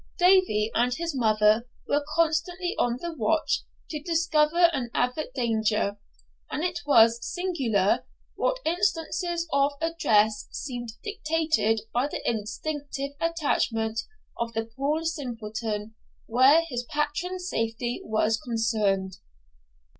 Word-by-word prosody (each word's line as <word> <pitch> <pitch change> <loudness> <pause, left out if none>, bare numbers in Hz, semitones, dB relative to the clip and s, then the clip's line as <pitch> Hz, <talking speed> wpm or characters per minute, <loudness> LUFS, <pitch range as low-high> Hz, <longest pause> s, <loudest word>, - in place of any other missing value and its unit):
Davie 355 - +4
and 245 +1 +2
his 335 -2 -3
mother 215 -1 +3 0.2
were 290 +1 +1
constantly 335 +2 +1
on 240 0 +1
the 340 -1 -4
watch 310 +4 0 0.3
to 305 -2 -4
discover 330 0 +2
and 255 -4 -2
avert 250 +3 0
danger; 220 -4 0 0.5
and 305 - -3
it 350 -1 -1
was 230 -4 +6
singular 250 - 0 0.3
what - - 0
instances 345 -1 0
of 280 +1 +3
address 220 -11 +2
seemed 240 -4 -5
dictated 315 - 0
by 245 +4 +1
the - - -5
instinctive 275 +5 -3
attachment 235 -9 0 0.4
of 235 0 -1
the 225 0 -1
poor 295 +4 0
simpleton 225 -8 -4 0.3
when 265 +8 +5
his 245 -5 -3
patron's 350 +6 -2
safety 230 -2 -2
was 220 0 +1
concerned. 210 -5 0
265 Hz, 115 wpm, -26 LUFS, 225-325 Hz, 0.5 s, was